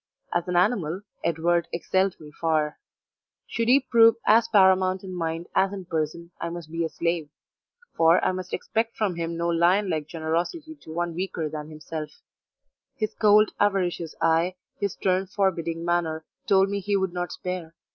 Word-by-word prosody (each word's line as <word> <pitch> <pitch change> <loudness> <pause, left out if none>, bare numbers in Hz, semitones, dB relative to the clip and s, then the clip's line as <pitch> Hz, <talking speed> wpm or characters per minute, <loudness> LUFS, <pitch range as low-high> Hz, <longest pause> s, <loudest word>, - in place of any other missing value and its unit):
As 175 0 0
an 180 - -2
animal, 180 -2 +1 0.2
Edward 170 +1 +1
excelled 190 +2 0
me 150 -1 -12
far; 155 -2 +1 0.7
should 230 -1 -2
he 260 +3 +6
prove 230 -4 +5
as 225 +2 +5
paramount 190 -1 +4
in 185 -1 -7
mind 165 -1 -3
as 195 0 +3
in 190 -2 -6
person 170 0 -3
I 170 - -2
must 170 -2 -8
be 165 0 -1
a 160 - -1
slave 170 -3 -2 0.7
for 165 +1 +5
I - - +3
must 185 0 -6
expect 225 +1 -2
from 205 -5 0
him 165 0 -3
no 170 0 -1
lion 175 +4 +3
like 155 -2 -2
generosity 170 - -3
to 225 - -13
one 170 +1 -2
weaker 170 -3 -3
than 150 0 -6
himself; 155 0 -6 0.9
his 215 -1 -2
cold, 210 0 +5
avaricious 180 -5 0
eye, 165 +3 +2 0.2
his 200 -2 -1
stern, 190 0 0
forbidding 170 -4 -1
manner 165 -2 0 0.2
told 195 0 +4
me 200 - -1
he 200 +1 0
would 190 -2 -1
not 175 0 -3
spare. 180 -3 -5
175 Hz, 170 wpm, -25 LUFS, 165-195 Hz, 0.9 s, he